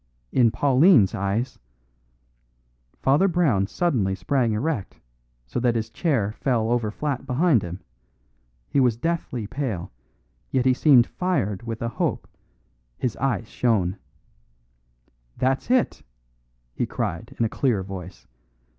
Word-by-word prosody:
In 120 -3 +4
Pauline's 130 - +4
eyes 105 +6 -2 0.7
" - - -43
Father 145 +9 +4
Brown 155 - +2
suddenly 110 - 0
sprang 125 +2 0
erect, 115 -1 -3 0.5
so 95 - -3
that 120 -1 +1
his 115 0 -2
chair 125 - 0
fell 115 -1 0
over 120 -3 +1
flat 135 +3 -3
behind 135 - +3
him. 90 +2 -7 0.9
He - - +1
was 125 -4 +3
deathly 165 -7 -2
pale, 110 -7 -4 0.6
yet 130 -1 0
he 130 - +5
seemed 130 -3 +5
fired 115 - -1
with 115 -1 -5
a - - 0
hope; 115 - -2 0.7
his 125 - -2
eyes 120 -5 -1
shone. 100 -8 +1 1.4
"That's 130 - 0
it!" 255 -1 +2 0.7
he - - -2
cried - - -4
in 115 - +2
a - - +2
clear 110 -4 0
voice. 95 -1 -9
120 Hz, 130 wpm, -24 LUFS, 100-135 Hz, 1.4 s, he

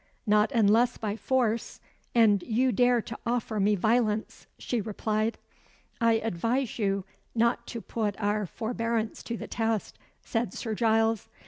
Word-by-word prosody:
"Not 210 +2 +3
unless 230 0 +3
by 210 -2 -3
force 235 -1 0 0.4
and 215 -4 +5
you 250 +5 +1
dare 245 -2 +3
to 230 - -7
offer 230 -2 -1
me 205 +1 +3
violence," 220 +1 0
she 240 -3 -2
replied. 215 +1 -1 0.6
"I 230 0 +5
advise 225 +4 -1
you 195 -2 0 0.3
not 235 +1 +1
to 230 - -5
put 215 -3 -3
our 205 -1 0
forbearance 230 +1 -2
to 230 - -5
the - - -6
test," 225 -2 -2 0.2
said 230 +1 -2
Sir 225 - -3
Giles. 225 0 +1
225 Hz, 140 wpm, -28 LUFS, 210-235 Hz, 0.6 s, and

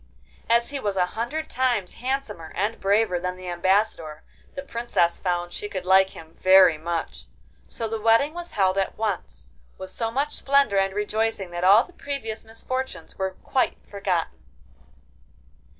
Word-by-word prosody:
As 235 +2 +4
he 280 - -3
was 205 -6 -2
a 180 - +4
hundred 260 +9 -3
times 240 -7 0
handsomer 245 -11 -3
and 210 +4 -1
braver 200 -2 +2
than 180 +1 -3
the 185 -1 -7
Ambassador, 175 -3 0 0.3
the 275 - -5
Princess 235 -10 0
found 175 -1 -2
she 205 - -5
could 185 -2 -5
like 190 +1 +5
him 160 0 -12
very 185 -3 +7
much. 170 0 -4 0.4
So 225 - -3
the 220 0 -4
wedding 230 +7 +4
was 345 0 -6
held 190 -1 +2
at 195 - -2
once, 180 - -4 0.3
with 190 0 -6
so 225 +2 -2
much 280 +5 -1
splendour 275 -8 +3
and 195 0 0
rejoicing 210 -2 -1
that 175 0 -4
all 200 +5 +7
the 360 - -17
previous 270 -9 -5
misfortunes 255 +3 -5
were 190 -1 -2
quite 260 - 0
forgotten. 190 -4 -2
205 Hz, 160 wpm, -24 LUFS, 185-235 Hz, 0.4 s, very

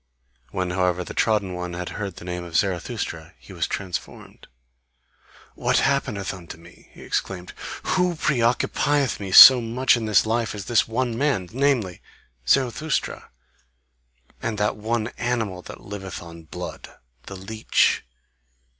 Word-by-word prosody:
When 90 +5 -2
however 90 0 0
the - - -8
trodden 105 -4 +1
one 90 0 -5
had 90 0 -5
heard 100 -4 -5
the - - -11
name 90 0 -4
of 85 -2 -9
Zarathustra 95 -3 -3
he - - -14
was - - -1
transformed. 95 -4 -6 1.1
"What - - +1
happeneth 110 -9 0
unto 85 -3 -10
me!" 85 +1 -18
he - - -14
exclaimed, 90 -2 -3 0.3
"WHO 180 -1 +1
preoccupieth 140 0 +1
me 100 -2 -5
so 130 +5 +11
much 120 +3 +2
in 115 -2 -3
this 105 -1 +4
life 115 0 -1
as 100 -2 -6
this 120 -3 +2
one 120 +1 -1
man, 120 -9 0
namely 125 -9 0 0.5
Zarathustra, 140 +3 0 1.1
and 115 -2 -3
that 105 0 0
one 110 +1 -2
animal 115 -6 -2
that - - -11
liveth 95 -2 -7
on 85 -1 -12
blood, 75 - -8 0.4
the 100 - -7
leech? 110 +4 +1
105 Hz, 140 wpm, -23 LUFS, 90-120 Hz, 1.1 s, so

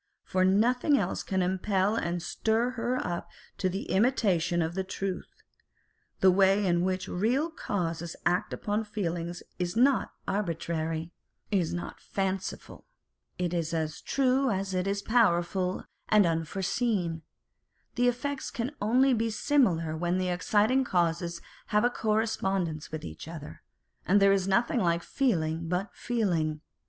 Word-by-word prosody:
For 185 - +1
nothing 245 +9 +3
else 190 -6 -1
can 190 -1 0
impel 190 +2 +1
and 170 -5 -2
stir 225 +6 0
her 245 +1 -1
up 175 0 -3 0.3
to 185 - +1
the 190 +2 -3
imitation 190 -7 +2
of 160 +1 -3
the 190 +1 -1
truth. 190 0 -4 0.9
The 190 - +7
way 195 +2 +4
in 175 -2 +2
which 185 0 -1
real 250 - 0
causes 170 - -3
act 180 +4 +1
upon 210 0 -1
the 220 - -4
feelings 175 -4 -3 0.2
is 175 0 -2
not 255 +2 +3 0.2
arbitrary, 165 -4 -2 0.4
is 185 -5 +1
not 175 - -5
fanciful; 190 -1 -4 0.5
it 180 -1 -1
is 170 -1 -1
as 155 -2 -2
true 270 0 +2
as 195 -2 -1
it 185 +1 0
is 200 0 -1
powerful 185 -5 +2 0.2
and 210 -2 +6
unfore 165 +3 -1
seen; 195 -6 0 0.7
the 245 0 +2
effects 270 +3 -2
can 240 +3 -3
only 255 +6 +4
be 225 -1 +1
similar 205 - +2
when 175 +2 0
the 185 -1 0
exciting 210 +8 +2
causes 170 -4 0 0.3
have 210 +1 +2
a 245 - +3
correspondence 195 -8 -1
with 155 - -5
each 80 - -8
other, 155 - -9 0.5
and 200 +3 +5
there 195 0 +6
is 195 -1 +1
nothing 230 +5 +2
like 170 -3 +1
feeling 165 -10 0
but 180 +3 -1
feeling. 170 -10 -1
190 Hz, 145 wpm, -29 LUFS, 170-220 Hz, 0.9 s, The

